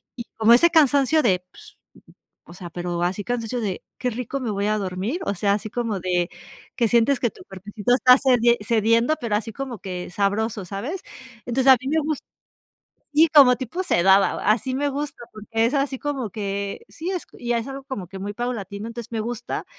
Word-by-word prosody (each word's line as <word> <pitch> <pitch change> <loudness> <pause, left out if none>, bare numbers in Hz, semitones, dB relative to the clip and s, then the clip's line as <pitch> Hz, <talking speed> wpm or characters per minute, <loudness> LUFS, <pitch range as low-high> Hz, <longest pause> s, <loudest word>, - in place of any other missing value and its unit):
Y 235 - -6
como 225 +1 +6
ese 340 +8 +6
cansancio 300 -1 +4
de 185 -7 +2
pues, - - -15 0.8
o - - -10
sea, 175 -1 -9
pero 175 0 -3
así 185 +3 -2
cansancio 245 0 -2
de 200 -5 -3
qué 250 - -1
rico 250 +3 -4
me 245 -4 -3
voy 200 0 -1
a 215 - +1
dormir, 195 - -3
o 200 - -1
sea, 200 +3 +1
así 215 +1 -3
como 225 -4 -2
de 175 -1 0 0.5
que 235 -3 +3
sientes 240 +4 +3
que 240 - +1
tu - - -16
cuerpecito 205 +4 -3
está 250 0 +6
cedien 240 -3 +4
cediendo, 230 +5 +2
pero 220 -3 -1
así 225 +1 -2
como 255 -1 -6
que 180 -2 -6
sabroso, 205 +2 -1
¿sabes? 235 - -5 0.4
Entonces, 260 +2 +4
a 260 - +7
mí 265 - -7
me 315 +2 +2
gus 305 -1 -2 0.9
Sí, 310 +3 +5
como 260 -4 +8
tipo 260 +9 -4
sedada, 195 - +4 0.2
así 250 +4 -1
me 285 +2 0
gusta, 285 -2 -5
porque 215 0 -11 0.2
es 240 - 0
así 275 -1 0
como 270 -6 -3
que 200 - -4
sí 340 +3 -6
es 365 -3 -3
y 240 0 -1
es 230 +2 -1
algo 275 0 -6
como 260 -9 -6
que 190 +1 -9
muy 205 +1 -5
paulatino. 210 -4 -4
Entonces 235 0 -8
me 225 - -2
gusta, 235 +1 -4
230 Hz, 200 wpm, -23 LUFS, 200-265 Hz, 0.9 s, como